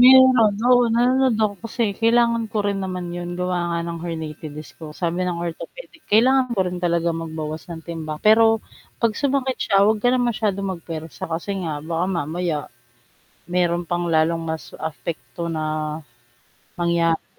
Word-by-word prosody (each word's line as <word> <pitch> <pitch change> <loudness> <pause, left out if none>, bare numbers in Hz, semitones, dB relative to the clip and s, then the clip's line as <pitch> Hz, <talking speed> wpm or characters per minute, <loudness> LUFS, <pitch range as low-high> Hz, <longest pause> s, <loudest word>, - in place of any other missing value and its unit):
Mayroon 260 +1 +9
no'n, 215 -3 +4 0.2
oo, 245 - +6
nanonood 255 0 +3
ako 205 -1 0
kasi 230 +1 -1 0.2
kailangan 230 0 +3
ko - - -3
rin 200 -1 -1
naman 180 -2 -4
'yon 175 0 -5
gawa 180 0 0
nga 170 0 -1
ng 170 -1 -5
herniated 155 -2 -5
disc 155 0 -9
ko; 160 - -7
sabi 175 0 0
ng 180 -1 -1
orthopedic 330 - -8
kailangan 255 +4 +5
ko - - -5
rin 180 0 -3
talaga 170 -1 +2
magbawas 155 -1 -5
ng 165 -2 -8
timbang, 160 -2 -5
pero 225 +1 +7 0.5
'pag 230 -2 +1
sumakit 270 -2 0
siya 195 - +2
huwag 215 +1 +2
ka 245 - +3
lang 255 -1 +2
masyadong 200 -3 -1
magpuwersa 165 -2 -7
kasi 165 +5 -3
nga 165 -4 -2
baka 165 +1 -1
mamaya, 170 -1 -1 1.0
mayroon 175 -1 +1
pang 175 0 0
lalong 165 +1 +2
mas 160 0 -5 0.2
apekto 150 -1 -6
na 155 -1 -2 1.1
mangyari. 170 -1 +1
175 Hz, 160 wpm, -22 LUFS, 165-225 Hz, 1.1 s, Mayroon